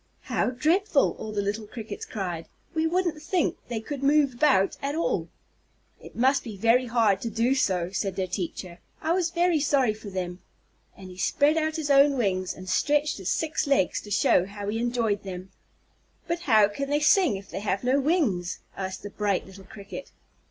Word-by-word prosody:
"How - - 0
dreadful!" 310 - +2
all 220 - -5
the 205 -1 -1
little 210 +2 -3
Crickets 220 0 -7
cried. 175 -6 -4 0.3
"We 320 0 +1
wouldn't 340 -2 0
think 340 +1 0
they 235 -2 -3
could 275 +5 -6
move 280 -1 +3
about 245 -7 +3
at 280 +1 -2
all." 330 - 0 0.7
"It - - -13
must 265 +3 +3
be 215 -4 -7
very 230 +5 +3
hard 225 -5 +2
to 230 - -3
do 230 +4 +1
so," 185 -9 0
said 195 -1 -2
their 190 - -1
teacher; 180 -1 -5 0.2
"I 320 - -1
was 355 -2 +1
very 345 -1 +2
sorry 275 -6 +2
for 215 -1 -10
them," 180 -2 -4 0.6
and 185 -1 -10
he 180 - -12
spread 290 - +3
out 315 -1 0
his 300 -3 -1
own 280 0 +5
wings 185 -5 0
and 185 0 -10
stretched 295 +7 +1
his 190 - -3
six 315 -1 -1
legs 275 -10 +2
to 210 - -12
show 185 -2 +3
how 200 0 -6
he 225 +2 -2
enjoyed 235 -4 0
them. 185 -1 -8 0.8
"But 340 +1 -1
how 220 -11 +5
can 275 +7 -5
they 290 +1 +2
sing 310 - +4
if 195 0 -12
they - - -4
have 195 -1 -2
no 255 +3 +3
wings?" 265 - 0 0.2
asked 190 -1 -5
the 205 - -7
bright 205 -3 -1
little 190 0 -13
Cricket. 200 +7 -9
230 Hz, 195 wpm, -26 LUFS, 195-290 Hz, 0.8 s, own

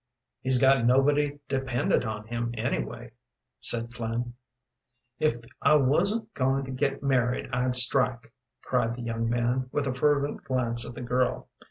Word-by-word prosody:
"He's 130 -1 +1
got 135 -1 +4
nobody 145 +4 +3
dependent 135 -3 0
on 105 -1 -4
him, 120 +1 -3
anyway," 110 - -3 0.5
said 115 0 0
Flynn. 120 0 -3 0.9
"If 155 -5 +2 0.3
I 150 - +5
wasn't 195 - +1
going 135 +1 0
to 130 - -7
get 135 +2 -1
married 125 -2 0
I'd 125 0 +1
strike," 125 -2 +2 0.3
cried 120 -2 0
the 120 - -7
young 115 0 -2
man, 120 +2 0
with 145 - -1
a 130 - -1
fervent 145 +2 +1
glance 120 -3 0
at 120 - -10
the 135 - -7
girl. 125 +1 -1
125 Hz, 150 wpm, -27 LUFS, 120-135 Hz, 0.9 s, I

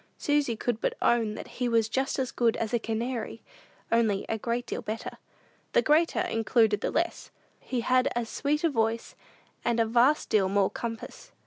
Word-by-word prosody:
Susy 290 -5 +1
could 230 0 -2
but - - 0
own 225 -3 +2
that - - -7
he 245 - +2
was 230 -2 +3
just 265 +4 -1
as 260 -2 -1
good 235 -2 +1
as 225 +1 -3
a 240 - +3
canary, 230 +1 -3 0.5
only 220 -4 +2
a 225 - -1
great 235 +2 -2
deal - - -4
better. 220 +1 -5 0.5
"The - - +4
greater 315 +2 +3
included 225 -2 +2
the - - 0
less." 340 +1 -2 0.3
He 250 -2 -3
had 255 +2 +3
as 240 -1 -1
sweet 295 +6 -1
a 335 - +4
voice, 225 -2 -1 0.5
and 235 -1 +1
a 230 - +4
vast 245 +6 +3
deal 195 -3 +3
more 195 -1 +2
compass. 230 -1 -7
235 Hz, 185 wpm, -28 LUFS, 225-255 Hz, 0.5 s, The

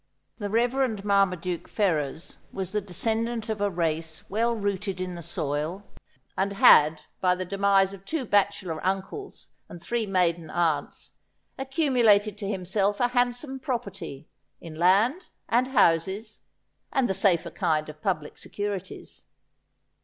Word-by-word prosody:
The 205 -1 -3
Reverend 235 -1 0
Marmaduke 185 -4 +1
Fer 195 -7 +1
rers 150 +3 -5
was 190 -1 -4
the 210 0 0
descendant 225 +4 -2
of 215 -2 -2
a 205 - +2
race 160 -3 -3
well 230 +3 +1
rooted 200 -2 -2
in 185 -1 -3
the 170 - -7
soil, 160 +2 -3 0.5
and 200 +1 0
had, 155 -5 +6 0.2
by 180 -1 +3
the 185 0 -4
demise 195 0 +2
of 195 -1 -11
two 280 +5 -3
bachelor 200 -6 0
uncles 195 - -4 0.2
and 175 - -9
three 225 +5 -2
maiden 175 -4 +1
aunts, 165 -3 -1 0.4
accumulated 245 - +2
to 200 - -4
himself 195 +1 0
a 245 - +2
handsome 245 +2 -1
property, 205 - -5 0.3
in 165 -2 -9
land, 200 - +3 0.2
and 245 +2 +2
houses, 195 -2 +1 0.5
and 265 -2 +2
the 190 - 0
safer 180 -3 +2
kind 155 -1 0
of 155 0 -11
public 150 -1 -2
securities. 205 -2 -6
195 Hz, 140 wpm, -26 LUFS, 175-225 Hz, 0.5 s, had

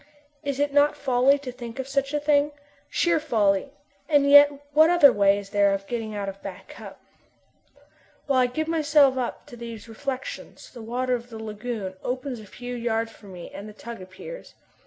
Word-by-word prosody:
Is 280 -2 -3
it 290 0 0
not 290 +1 +4
folly 265 +1 +3
to 275 -3 -7
think 240 -1 -9
of 265 0 -4
such 275 0 -1
a 295 - 0
thing? 295 0 +2 0.4
Sheer 340 -2 +2
folly, 220 -6 +1 0.4
and 290 -2 +4
yet 285 0 +9 0.2
what 310 +2 +6
other 300 -7 +7
way 200 0 +4
is 200 0 -8
there 200 -1 +3
of 195 0 -7
getting 225 -1 -4
out 200 -1 -3
of 195 0 -7
Back - - -9
Cup? - - -11 1.3
While 275 -2 +2
I 250 - +4
give 310 +6 -3
myself 300 -4 +4
up 255 -2 -4
to 285 -5 -12
these 230 -2 -9
reflections 260 +3 -6
the 240 - -10
water 250 +3 -2
of 240 0 -3
the 225 - -8
lagoon 215 -3 -5
opens 255 0 -3
a 215 - -12
few 245 +4 -8
yards 230 -1 -1
from 205 -3 -15
me 175 -1 -9
and 205 +2 -8
the - - -11
tug 230 0 -9
appears. 190 - -10
245 Hz, 195 wpm, -25 LUFS, 220-285 Hz, 1.3 s, yet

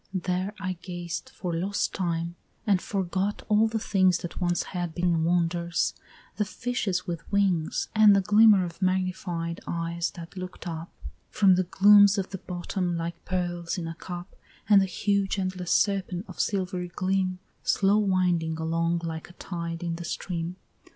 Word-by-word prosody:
There 185 +3 -1
I 185 -2 -3
gazed 175 +5 -5
for 180 -9 -5
lost 190 +5 -1
time, 170 -2 -2 0.3
and 195 -4 +3
forgot 195 +1 -2
all 215 +1 +4
the 225 0 -2
things 185 -4 +3
That 175 +1 -7
once 175 -1 +1
had 175 -3 -3
been 175 -2 +1
wonders 170 0 +1 0.4
the 210 - +2
fishes 210 -5 -2
with 170 -3 -6
wings, 190 -6 +1
And 215 -2 +7
the 195 - +4
glimmer 210 -1 +6
of 170 +2 -9
magnified 185 -2 -1
eyes 170 0 -2
that 170 +1 -9
look'd 185 0 -7
up 165 0 -5 0.4
From 195 -2 +5
the 185 0 +2
glooms 205 +2 +6
of 195 -1 -2
the 190 - -5
bottom 175 0 -3
like 170 0 -5
pearls 175 -1 -2
in 170 -2 -3
a 165 - -4
cup, 175 +2 -8 0.3
And 200 -1 +7
the 195 - +1
huge 200 +1 0
endless 185 -2 -3
serpent 195 -2 +1
of - - -11
silvery 185 -3 -1
gleam, 185 0 0 0.2
Slow 200 +1 +3
winding 180 -5 +1
along 165 +1 0
like 160 0 -5
a - - -14
tide 170 -1 -5
in 170 -1 -2
the 170 - -6
stream. 170 0 -4
180 Hz, 165 wpm, -27 LUFS, 170-195 Hz, 0.4 s, And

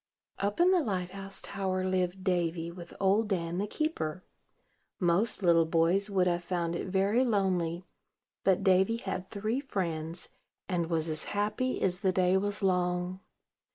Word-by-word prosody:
Up 200 +1 -1
in 355 +2 +6
the 365 -2 +4
light 185 - -2
house 195 0 -6
tower 190 -2 -2
lived 185 0 -1
Davy, 170 -2 0
with 170 -1 -10
Old 200 +3 +3
Dan 175 -3 -1
the 205 - -1
keeper. 185 - -2 0.8
Most 185 +4 +1
little 165 -2 +5
boys 170 +5 +2
would 190 -2 +2
have 175 -1 0
found 170 -1 -1
it - - -3
very 200 +6 +2
lonely; 185 -6 0 0.6
but 190 -2 +3
Davy 190 +4 +4
had 190 -4 -5
three 215 +5 -2
friends, 170 - -3 0.4
and 170 -3 -1
was 165 -1 0
as 155 -1 -2
happy 215 +5 0
as 180 -1 +2
the 190 -2 +2
day 185 0 +3
was 205 +1 0
long. 180 0 0
185 Hz, 155 wpm, -30 LUFS, 175-200 Hz, 0.8 s, in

